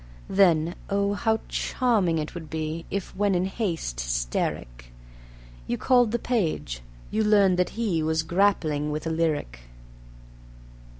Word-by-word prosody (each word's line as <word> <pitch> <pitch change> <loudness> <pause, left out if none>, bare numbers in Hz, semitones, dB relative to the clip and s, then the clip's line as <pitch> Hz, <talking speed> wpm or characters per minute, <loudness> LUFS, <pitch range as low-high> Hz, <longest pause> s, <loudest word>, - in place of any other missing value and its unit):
Then, 170 -4 +4 0.2
oh, 200 0 +1
how 220 +1 0
charming 210 -10 +1
it 155 -1 -3
would 160 -3 -8
be 160 +1 -4
If, 200 -2 -4
when 200 -1 +2
in 180 +1 +1
haste 175 - -3
hysteric - - -3 0.8
You 120 - -1
called 245 -3 +4
the 235 - +1
page, 165 - -1 0.3
you 220 +1 +1
learned 200 -4 +4
that 180 - 0
he 200 -9 0
Was 160 +1 0
grappling 165 -4 +1
with 150 +1 -4
a 165 - -1
lyric. 155 - -1
170 Hz, 135 wpm, -26 LUFS, 155-205 Hz, 0.8 s, Then